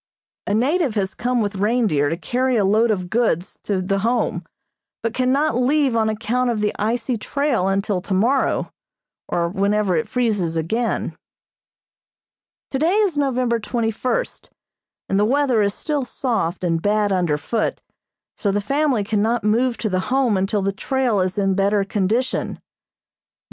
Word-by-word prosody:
A 205 - +1
native 275 +2 +1
has 190 -2 -1
come 245 0 0
with 205 -1 -2
reindeer 205 - +2
to 165 - -2
carry 255 +6 0
a 210 -4 +2
load 220 +4 +3
of 185 -4 -1
goods 205 -5 0
to 200 -3 -1
the 195 +2 0
Home, 235 +4 0 0.6
but 230 -1 -1
cannot 260 +3 +1
leave 265 0 +2
on 220 -1 +2
account 235 +3 0
of 230 -3 -1
the 210 0 0
icy 230 +2 -1
trail 275 -7 0
until 195 -1 0
tomorrow, 220 +8 +1 0.6
or 170 -1 0
whenever 200 +1 +1
it 235 - 0
freezes 205 -9 0
again. 225 +9 -1 1.6
Today 315 +8 +1
is 410 -6 +2
November 255 -4 +1
twenty 225 +1 -1
first, 255 - -3 0.6
and 195 - +1
the - - +4
weather 255 0 +2
is 200 0 0
still 295 -3 -2
soft 225 -9 -2
and 165 -2 0
bad 205 +1 +1
under 175 -6 +1
foot, 220 +8 -2 0.6
so 205 - -1
the 205 - +1
family 275 +1 +1
cannot 220 +3 0
move 235 +3 +2
to 220 - -2
the 185 -2 -2
Home 260 -4 +2
until 195 +1 0
the 195 - +1
trail 245 +1 0
is 185 +1 -1
in 195 -1 +2
better 200 +1 +2
condition. 210 +5 -1
220 Hz, 155 wpm, -21 LUFS, 195-250 Hz, 1.6 s, the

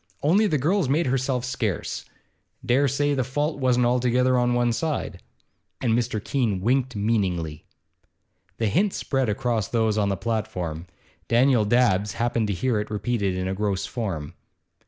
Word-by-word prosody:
Only 195 +9 +4
the 155 - +1
girl's 160 +3 +1
made 155 +5 +2
herself 130 -1 0
scarce. 120 -7 -3 0.6
Dare 135 +4 +3
say 145 +2 +1
the 130 -2 0
fault 145 +4 -2
wasn't 125 -2 +2
altogether 125 +1 +2
on 120 0 +2
one 120 -1 +2
side.' 145 - -3 0.6
And 120 -3 +1
Mr. 120 -1 0
Keene 110 -3 -1
winked 125 +4 0
meaningly. 95 -8 -1 0.9
The 115 - 0
hint 185 - +1
spread 135 -4 -1
among 115 0 0
those 110 -2 +1
on 100 -1 +1
the 100 - -1
platform. 90 -6 -3 0.4
Daniel 120 -1 +4
Dabbs 105 -3 +2
happened 115 -2 0
to 100 - -1
hear 110 +5 0
it 105 - -4
repeated 105 -3 -1
in 90 0 -2
a 95 - -1
gross 100 -1 -1
form. 95 - -4
120 Hz, 155 wpm, -24 LUFS, 105-130 Hz, 0.9 s, Only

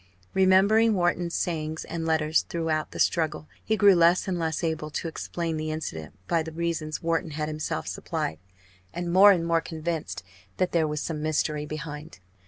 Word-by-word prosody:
Remembering 200 +4 +5
Wharton's 175 -1 0
sayings 160 -2 -2
and 165 -1 -4
letters 160 -1 +2
throughout 160 -2 -1
the - - -9
struggle, 155 -2 0 0.2
he 220 - 0
grew 205 -2 +7
less 170 +2 +4
and 180 -2 -1
less 160 -1 -2
able 160 -2 -2
to 160 - -4
explain 165 0 -3
the 155 0 -3
incident 80 - -5
by 165 -1 +2
the 160 0 -6
reasons 165 -1 -3
Wharton 165 +1 0
had 150 -1 -1
himself 155 0 -3
supplied, 80 0 -3 0.6
and 175 0 -3
more 200 +2 +9
and 170 -4 +1
more 165 -1 +2
convinced 155 - -4 0.3
that 185 -1 +1
there 165 -2 +2
was 150 0 -3
some 155 -2 -3
mystery 150 -1 -1
behind. 150 -1 -7
165 Hz, 175 wpm, -26 LUFS, 155-175 Hz, 0.6 s, more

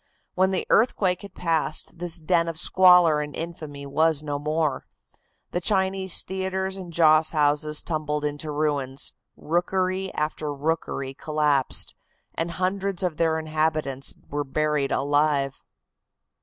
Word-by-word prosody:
When 185 +1 +2
the 190 - -1
earthquake 195 -5 +2
had 200 -2 -11
passed 160 -2 -1
this 175 -1 +1
den 170 +1 +1
of 165 -1 -4
squalor 175 -3 +5
and 150 0 -6
infamy 155 -4 -7
was 155 +2 +2
no 145 -1 -3
more. 155 0 -1 0.7
The 175 - -2
Chinese 190 -1 +1
theatres 190 0 -3
and 185 -3 -8
joss 155 -1 +4
houses 150 0 +2
tumbled 150 -2 -2
into 145 +1 -3
ruins, 145 -3 -1 0.2
rookery 185 +3 -1
after 150 0 -2
rookery 145 -2 -2
collapsed, 150 -2 +1 0.4
and 165 +1 -2
hundreds 185 +1 -1
of 175 -4 -1
their 160 -1 +2
inhabitants 155 -3 -1 0.2
were 145 0 -1
buried 150 0 0
alive. 145 -1 +1
155 Hz, 130 wpm, -25 LUFS, 150-180 Hz, 0.7 s, squalor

